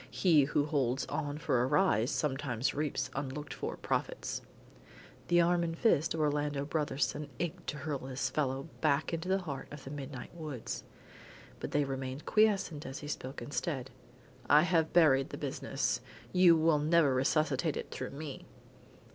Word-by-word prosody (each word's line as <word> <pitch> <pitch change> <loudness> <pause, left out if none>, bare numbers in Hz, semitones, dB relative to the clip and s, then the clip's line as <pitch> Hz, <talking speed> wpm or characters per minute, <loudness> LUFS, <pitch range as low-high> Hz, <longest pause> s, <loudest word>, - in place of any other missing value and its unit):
He 155 -2 +4
who 145 +1 +1
holds 135 -3 0
on 145 -1 -2
for 140 -6 +1
a 125 - +2
rise 140 - +3
sometimes 135 -3 -1
reaps 150 0 -2
unlooked 135 +1 -4
for - - -4
profits." - - -2 0.9
The 175 0 +4
arm 175 0 +3
and 165 -1 -3
fist 165 -8 +3
of 160 - -1
Orlando 145 -1 0
Brotherson 150 -1 -1
ached 175 -3 -4
to 150 - -3
hurl 140 -1 -3
this 130 +1 -3
fellow 135 -2 0 0.2
back 155 +2 +2
into 165 +2 -3
the 190 0 +1
heart 140 -6 -5
of 150 -2 -9
the 135 - -8
midnight 135 -4 -7
woods. 155 -8 -5 0.8
But - - -4
they 145 - +2
remained 135 0 -4
quiescent 195 -8 +2
and 130 - -7
he 145 - -6
spoke 135 -2 -5
instead. 140 -3 -3 0.6
"I 150 +1 +7
have 165 -3 +2
buried 140 -6 +5
the - - -6
business. - - -2 0.3
You 180 -2 +7
will 160 -1 +3
never 155 -2 +4
resuscitate 145 +3 +1
it - - -6
through - - -4
me." 145 0 -7
145 Hz, 165 wpm, -32 LUFS, 135-160 Hz, 0.9 s, I